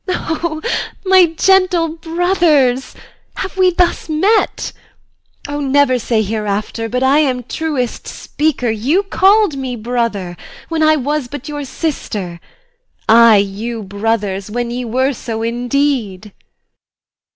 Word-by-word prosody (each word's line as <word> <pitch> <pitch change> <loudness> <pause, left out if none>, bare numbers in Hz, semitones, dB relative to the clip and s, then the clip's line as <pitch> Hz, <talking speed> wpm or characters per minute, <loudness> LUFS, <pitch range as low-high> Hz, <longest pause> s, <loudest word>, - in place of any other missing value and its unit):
O 320 -3 -3 0.4
my 375 -2 +6
gentle 370 -3 +3
brothers, 325 -6 +1 0.4
Have 380 - -5
we 370 -1 +4
thus 350 -1 0
met? 385 +9 +1 0.8
O, 290 0 -4
never 275 -2 +2
say 225 -1 0
hereafter 215 +2 -3
But 250 +2 -1
I 275 +3 +4
am 255 -5 0
truest 265 -2 -3
speaker! 295 -6 -1
You 270 - +1
call'd 395 -2 +3
me 260 -2 -4
brother, 220 -6 -3 0.3
When 325 -1 -1
I 310 0 +5
was 290 -1 -2
but 285 +2 -8
your 295 -1 -5
sister: 210 - -4 0.7
I 230 0 +7
you 210 +3 -2
brothers, 200 -1 -2
When 240 +2 -3
we 245 +1 -3
were 260 +4 0
so 225 -2 -5
indeed. 235 -4 -1
260 Hz, 120 wpm, -16 LUFS, 225-315 Hz, 0.8 s, I